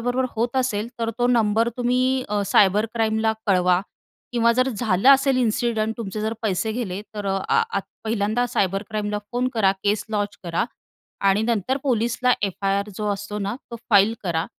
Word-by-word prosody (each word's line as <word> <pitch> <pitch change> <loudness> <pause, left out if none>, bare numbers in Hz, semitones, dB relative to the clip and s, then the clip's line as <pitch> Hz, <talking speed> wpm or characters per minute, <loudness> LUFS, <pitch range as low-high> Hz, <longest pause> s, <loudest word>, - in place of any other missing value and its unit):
बरोबर 245 +2 0
होत 235 +3 -1
असेल, 235 -4 0
तर 230 0 -1
तो 245 - +3
नंबर 230 -2 +2
तुम्ही 255 +1 +1
अ, 205 -1 0
सायबर 205 +2 +4
क्राईमला 220 -1 +1
कळवा 180 -2 +3 0.5
किंवा 235 -1 +3
जर 255 +2 +2
झालं 215 -2 +1
असेल 275 -1 +5
इन्सिडंट 230 -2 0
तुमचे 215 -2 -5
जर 220 +1 -1
पैसे 220 +1 0
गेले 210 -5 -3
तर 205 -1 -4
अ, 195 0 +1
अ, - - +4
आत 200 - -1 0.2
पहिल्यांदा 220 +2 0
सायबर 195 -3 0
क्राईमला 210 -1 -2
फोन 250 +1 0
करा, 200 -4 +3
केस 205 0 +1
लॉन्च 205 -1 -2
करा. 170 -1 0 0.6
आणि 195 +2 +3
नंतर 235 +2 0
पोलीसला 245 -1 +1
एफ-आई-आर 200 +1 -1
जो 210 - -3
असतो 205 +1 -5
ना 200 +1 -2 0.2
तो 235 - -5
फाइल 205 +1 +5
करा. 170 -4 -1
220 Hz, 175 wpm, -23 LUFS, 200-240 Hz, 0.6 s, असेल